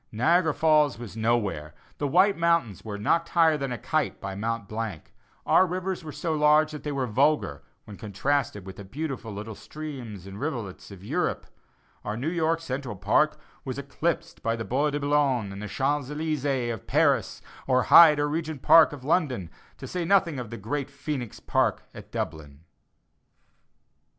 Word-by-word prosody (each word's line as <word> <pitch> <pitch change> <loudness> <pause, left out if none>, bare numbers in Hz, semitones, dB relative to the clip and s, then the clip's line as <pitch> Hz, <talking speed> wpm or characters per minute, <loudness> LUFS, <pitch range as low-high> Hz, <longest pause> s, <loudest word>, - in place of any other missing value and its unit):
Niagara 160 +9 +3
Falls 150 -3 +3
was 115 -3 -9
nowhere; 105 -10 -1 0.2
the 145 - 0
White 185 +7 +4
Mountains 170 - +1
were 105 -2 -5
"knocked 165 +11 +1
higher 165 -2 +4
than 135 -3 -3
a 125 - -3
kite" 155 +3 -1
by 100 0 -5
Mont 115 +1 -3
Blanc; 110 -6 -5 0.3
our 185 - +5
rivers 185 0 -3
were 155 - -7
so 165 +2 -3
large 150 0 +4
that 150 - -7
they 150 - -4
were 135 -2 -1
vulgar, 125 - +1 0.2
when 105 -2 -10
contrasted 110 0 -1
with 95 -1 -9
the 100 - -8
beautiful 130 +1 -5
little 105 +2 -6
streams 125 - -8
and 100 +1 -9
rivulets 115 -10 -5
of 95 -2 -12
Europe; - - -1 0.6
our 105 +1 -4
New 140 +7 -2
York 165 -1 0
Central 130 -6 -4
Park 150 +10 +2 0.2
was 130 -1 -5
eclipsed 165 +4 -3
by 115 0 0
the 110 -1 -5
Bois 140 +4 +1
de 145 0 -2
Bologne 140 -7 +1
and 100 +1 -8
the 105 - -5
Champs 140 +5 -1
Elysées 145 -5 -1
of 110 - -10
Paris, - - +2 0.3
or 130 -1 +3
Hyde 155 +3 +8
or 145 - +1
Regent 155 -2 -4
Park 160 -2 +7
of 140 -3 -9
London, 140 - 0 0.3
to - - -8
say 180 -1 -3
nothing 170 -5 +2
of 120 -4 -6
the 115 - -7
great 130 +7 -3
Phœnix 140 -4 -5
Park - - +1
at - - -12
Dublin. 75 -2 -5
135 Hz, 175 wpm, -26 LUFS, 110-155 Hz, 0.6 s, Hyde